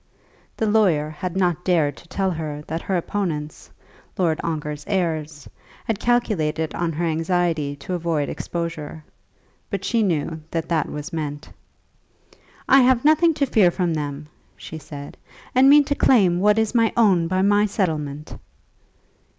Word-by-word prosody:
The 220 Hz, -, 0 dB
lawyer 185 Hz, -9 st, +2 dB
had 180 Hz, +4 st, -5 dB
not 180 Hz, -2 st, +1 dB
dared 160 Hz, -6 st, +1 dB
to 170 Hz, -, -16 dB
tell 190 Hz, +2 st, -1 dB
her 155 Hz, -3 st, -5 dB
that 165 Hz, +2 st, -4 dB
her 190 Hz, -, -1 dB
opponents, 165 Hz, -5 st, -4 dB, 0.5 s
Lord 165 Hz, -4 st, +1 dB
Ongar's 150 Hz, -2 st, -4 dB
heirs, 160 Hz, -6 st, -2 dB, 0.4 s
had 220 Hz, -3 st, -2 dB
calculated 165 Hz, -11 st, 0 dB
on 170 Hz, -1 st, -1 dB
her 170 Hz, +3 st, -2 dB
anxiety 165 Hz, -3 st, 0 dB
to 145 Hz, +6 st, -7 dB
avoid 165 Hz, -4 st, -1 dB
exposure; 160 Hz, -2 st, -5 dB, 0.7 s
but 195 Hz, -1 st, -4 dB
she 230 Hz, -2 st, +1 dB
knew 160 Hz, -4 st, -1 dB
that 165 Hz, -1 st, -3 dB
that 160 Hz, -3 st, 0 dB
was 150 Hz, +4 st, -7 dB
meant. 150 Hz, -2 st, -5 dB, 1.2 s
"I 270 Hz, +1 st, +7 dB
have 250 Hz, 0 st, +3 dB
nothing 315 Hz, +1 st, +4 dB
to 285 Hz, -2 st, +1 dB
fear 210 Hz, -8 st, +4 dB
from 175 Hz, -1 st, -1 dB
them," 145 Hz, -1 st, -4 dB, 0.3 s
she 160 Hz, -, -8 dB
said, 145 Hz, -2 st, -10 dB, 0.4 s
"and 260 Hz, +2 st, +6 dB
mean 290 Hz, +1 st, +7 dB
to 285 Hz, -, -1 dB
claim 195 Hz, -11 st, +3 dB
what 210 Hz, +2 st, +3 dB
is 220 Hz, 0 st, +1 dB
my 230 Hz, -2 st, +3 dB
own 190 Hz, -7 st, +4 dB
by 185 Hz, +2 st, 0 dB
my 205 Hz, +1 st, +3 dB
settlement." 155 Hz, -7 st, -3 dB
170 Hz, 150 wpm, -22 LUFS, 155-205 Hz, 1.2 s, I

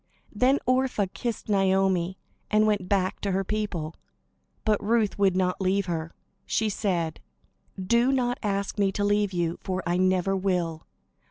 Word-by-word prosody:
Then 255 Hz, +6 st, +3 dB
Orpah 255 Hz, -5 st, +2 dB
kissed 235 Hz, -3 st, -4 dB
Naomi, 190 Hz, -2 st, +2 dB, 0.3 s
and 215 Hz, 0 st, +4 dB
went 205 Hz, -4 st, 0 dB
back 190 Hz, -2 st, 0 dB
to 200 Hz, -2 st, -1 dB
her 195 Hz, +1 st, +1 dB
people; 190 Hz, -7 st, -3 dB, 0.7 s
but 210 Hz, -2 st, +2 dB
Ruth 220 Hz, -1 st, +1 dB
would 190 Hz, -2 st, +3 dB
not 180 Hz, 0 st, 0 dB
leave 190 Hz, +1 st, +1 dB
her. 165 Hz, -2 st, -4 dB, 0.3 s
She 220 Hz, -1 st, +1 dB
said: 175 Hz, -6 st, -1 dB, 0.6 s
"Do 235 Hz, +7 st, +3 dB
not 245 Hz, -2 st, 0 dB
ask 200 Hz, -1 st, -2 dB
me 195 Hz, -1 st, +3 dB
to 205 Hz, -, -1 dB
leave 205 Hz, -1 st, +2 dB
you, 170 Hz, -2 st, -1 dB
for 185 Hz, -1 st, -3 dB
I 175 Hz, +1 st, +1 dB
never 185 Hz, +1 st, +2 dB
will. 180 Hz, -4 st, -1 dB
195 Hz, 155 wpm, -26 LUFS, 185-215 Hz, 0.7 s, and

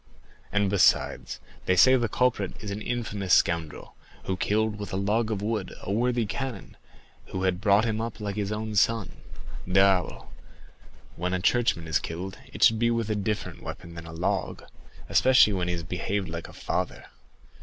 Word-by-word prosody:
And, 105 Hz, -1 st, +2 dB
besides, 95 Hz, -1 st, +2 dB, 0.3 s
they 95 Hz, -, +4 dB
say 130 Hz, +8 st, +7 dB
that 130 Hz, -, +4 dB
the 120 Hz, -2 st, 0 dB
culprit 115 Hz, -5 st, 0 dB
is 105 Hz, -3 st, -6 dB
an 100 Hz, +2 st, -4 dB
infamous 105 Hz, -6 st, 0 dB
scoundrel, 85 Hz, -3 st, 0 dB, 0.3 s
who 95 Hz, -, -2 dB
killed 105 Hz, +2 st, 0 dB
with 100 Hz, -3 st, -6 dB
a -, -, -3 dB
log 105 Hz, +4 st, 0 dB
of 105 Hz, -2 st, -2 dB
wood 105 Hz, -3 st, -2 dB
a -, -, -4 dB
worthy 120 Hz, +2 st, +1 dB
canon 125 Hz, 0 st, -5 dB, 0.5 s
who 95 Hz, -, -4 dB
had 95 Hz, -1 st, 0 dB
brought 100 Hz, +2 st, +4 dB
him 110 Hz, -1 st, -1 dB
up 115 Hz, -1 st, -5 dB
like 100 Hz, -2 st, -4 dB
his 105 Hz, -1 st, -2 dB
own 110 Hz, 0 st, -3 dB
son. 110 Hz, 0 st, +2 dB, 0.6 s
Diable! 90 Hz, -10 st, +2 dB, 0.9 s
when 90 Hz, +2 st, -1 dB
a -, -, -1 dB
churchman 110 Hz, -4 st, +1 dB
is 80 Hz, -, +2 dB
killed, 90 Hz, +4 st, -6 dB
it -, -, -2 dB
should 110 Hz, -1 st, +6 dB
be 115 Hz, 0 st, +3 dB
with 115 Hz, -2 st, -1 dB
a -, -, +1 dB
different 105 Hz, +1 st, -3 dB
weapon 85 Hz, -1 st, -8 dB
than 85 Hz, -1 st, -9 dB
a -, -, -8 dB
log, 80 Hz, +2 st, -2 dB, 0.4 s
especially 130 Hz, -5 st, +5 dB
when 90 Hz, -2 st, -1 dB
he 90 Hz, -, 0 dB
has 85 Hz, -1 st, -4 dB
behaved 95 Hz, +2 st, -2 dB
like 85 Hz, 0 st, -6 dB
a -, -, -13 dB
father. -, -, -3 dB
100 Hz, 185 wpm, -27 LUFS, 90-110 Hz, 0.9 s, say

